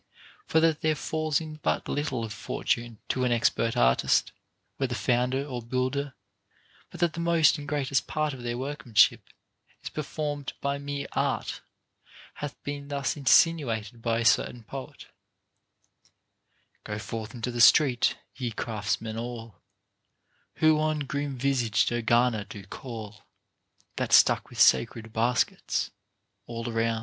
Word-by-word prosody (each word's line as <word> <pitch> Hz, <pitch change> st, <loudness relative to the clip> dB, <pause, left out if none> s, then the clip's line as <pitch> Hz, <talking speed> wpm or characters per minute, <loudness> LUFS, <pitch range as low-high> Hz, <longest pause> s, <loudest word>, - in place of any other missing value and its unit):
For 160 Hz, -, +3 dB
that 160 Hz, -2 st, +2 dB
there 155 Hz, 0 st, +2 dB
foils 155 Hz, -1 st, -1 dB
in 155 Hz, -1 st, -8 dB
but -, -, 0 dB
little 140 Hz, -5 st, -2 dB
of 110 Hz, -, -6 dB
Fortune 120 Hz, +2 st, -2 dB
to 130 Hz, -, 0 dB
an 125 Hz, -, +1 dB
expert 115 Hz, 0 st, +1 dB
artist, 60 Hz, +1 st, +3 dB, 0.5 s
whether 130 Hz, -3 st, -1 dB
founder 125 Hz, +4 st, +1 dB
or 125 Hz, -4 st, -5 dB
builder, 130 Hz, +3 st, -2 dB, 0.7 s
but -, -, -11 dB
that 170 Hz, -2 st, +2 dB
the 170 Hz, -, -6 dB
most 170 Hz, -2 st, +4 dB
and 145 Hz, -, -8 dB
greatest 140 Hz, -3 st, 0 dB
part 155 Hz, -2 st, -1 dB
of 130 Hz, -, -9 dB
their 120 Hz, 0 st, -3 dB
workmanship 130 Hz, -4 st, +2 dB, 0.5 s
is -, -, -6 dB
performed 145 Hz, -2 st, -4 dB
by 140 Hz, 0 st, -2 dB
mere 140 Hz, 0 st, -4 dB
art, -, -, -1 dB, 0.8 s
hath 145 Hz, -3 st, -4 dB
been 145 Hz, 0 st, -5 dB
thus 140 Hz, -1 st, -2 dB
insinuated 125 Hz, -6 st, +2 dB
by 115 Hz, 0 st, 0 dB
a 115 Hz, -, -1 dB
certain 120 Hz, 0 st, +2 dB
poet: 135 Hz, +4 st, -8 dB, 1.8 s
Go 105 Hz, -1 st, -5 dB
forth 110 Hz, +2 st, -6 dB
into 120 Hz, +1 st, -3 dB
the 120 Hz, 0 st, -1 dB
street, 125 Hz, +2 st, +5 dB, 0.2 s
ye 125 Hz, -3 st, -3 dB
craftsmen 110 Hz, 0 st, -3 dB
all, 115 Hz, -5 st, -7 dB, 0.9 s
Who 155 Hz, -1 st, +4 dB
on 155 Hz, -1 st, 0 dB
grim 140 Hz, -1 st, -3 dB
visaged 125 Hz, -5 st, +1 dB
Ergana 120 Hz, -2 st, +2 dB
do 100 Hz, -, -8 dB
call, 110 Hz, -1 st, -8 dB, 0.8 s
That's -, -, +3 dB
stuck -, -, +4 dB
with -, -, -10 dB
sacred 115 Hz, -1 st, +3 dB
baskets 120 Hz, +3 st, 0 dB, 0.6 s
all 115 Hz, 0 st, -5 dB
around. 115 Hz, 0 st, 0 dB
125 Hz, 140 wpm, -27 LUFS, 115-145 Hz, 1.8 s, street